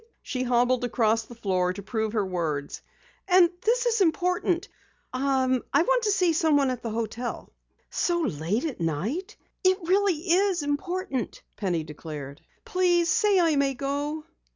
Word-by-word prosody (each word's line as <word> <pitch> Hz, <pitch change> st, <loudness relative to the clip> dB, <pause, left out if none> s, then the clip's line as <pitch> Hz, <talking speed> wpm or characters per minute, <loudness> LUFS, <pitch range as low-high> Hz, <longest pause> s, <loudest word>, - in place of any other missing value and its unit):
She 255 Hz, -, -3 dB
hobbled 245 Hz, 0 st, +2 dB
across 225 Hz, -2 st, +1 dB
the 240 Hz, -, -12 dB
floor 185 Hz, -5 st, 0 dB
to 200 Hz, +1 st, -8 dB
prove 220 Hz, +1 st, -2 dB
her 210 Hz, -3 st, +1 dB
words. 160 Hz, -6 st, -3 dB, 0.5 s
"And 360 Hz, -2 st, +5 dB
this 485 Hz, +2 st, +1 dB
is 460 Hz, -3 st, +2 dB
important. 360 Hz, +1 st, +1 dB, 0.5 s
I 260 Hz, 0 st, +1 dB, 0.2 s
want -, -, +3 dB
to 420 Hz, -, +3 dB
see 365 Hz, -4 st, +2 dB
someone 290 Hz, -4 st, +3 dB
at 250 Hz, -2 st, -5 dB
the 230 Hz, -, -4 dB
hotel." 230 Hz, +2 st, -4 dB, 0.4 s
"So 345 Hz, -1 st, 0 dB
late 195 Hz, -, -1 dB
at 275 Hz, -, -4 dB
night?" 220 Hz, -, -2 dB, 0.3 s
"It 370 Hz, 0 st, +4 dB
really 375 Hz, -3 st, +2 dB
is 370 Hz, -2 st, +3 dB
important," 290 Hz, -, -3 dB
Penny 180 Hz, -6 st, -1 dB
declared. 150 Hz, -2 st, -8 dB, 0.2 s
"Please 350 Hz, -2 st, +2 dB
say 410 Hz, -3 st, +3 dB
I 330 Hz, -3 st, +3 dB
may 275 Hz, -1 st, +1 dB
go." 285 Hz, +3 st, -3 dB
275 Hz, 150 wpm, -26 LUFS, 220-355 Hz, 0.5 s, And